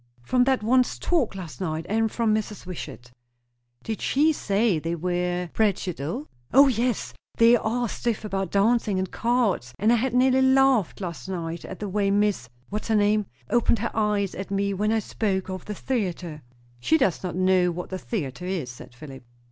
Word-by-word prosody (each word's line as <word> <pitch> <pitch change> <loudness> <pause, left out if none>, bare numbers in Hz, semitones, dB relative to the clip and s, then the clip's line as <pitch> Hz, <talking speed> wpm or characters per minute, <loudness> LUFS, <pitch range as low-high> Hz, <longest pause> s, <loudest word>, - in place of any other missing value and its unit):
"From 250 - +2
that 260 -4 +1
one's 250 +3 +2
talk 300 - 0
last 180 -2 -8
night. 160 -3 -2
And 220 +1 +1
from 230 -2 +1
Mrs. 215 -2 -3
Wishart." 135 -9 -8 0.7
"Did 220 -1 -4
she 305 +4 +3
say 205 - +1
they 165 +2 -3
were 180 +1 -2
puritanical?" 185 - -1 0.3
"Yes. - - -7
O 275 +1 +8
yes! 245 -2 -1 0.2
they 230 +1 +7
are 240 +1 0
stiff 225 0 -3
about 195 -3 -2
dancing 210 +1 +2
and 185 -1 -2
cards; 230 - 0
and 215 +6 +3
I - - +4
had 250 +1 -1
nearly 260 +1 +4
laughed 265 -7 +3
last 175 0 -6
night 170 -2 -4
at 190 - -7
the 210 - -4
way 200 +1 0
Miss 200 - +1 0.2
what's 210 +1 -4
her 220 - +2
name? 210 -1 +2 0.2
opened 235 0 +3
her 235 +3 -3
eyes 210 -3 +1
at 195 +1 -6
me 200 0 0
when 210 +3 0
I 225 - +2
spoke 195 -3 -2
of 185 -1 -6
the 210 - -5
theatre." 180 -10 -3 0.4
"She 320 - +3
does 200 - +1
not 180 -3 -4
know 185 -1 +3
what 175 +2 -5
the 185 - -3
theatre 180 - -4
is," 170 -10 -3
said 120 0 -13
Philip. 135 -1 -11
200 Hz, 190 wpm, -25 LUFS, 180-230 Hz, 0.7 s, O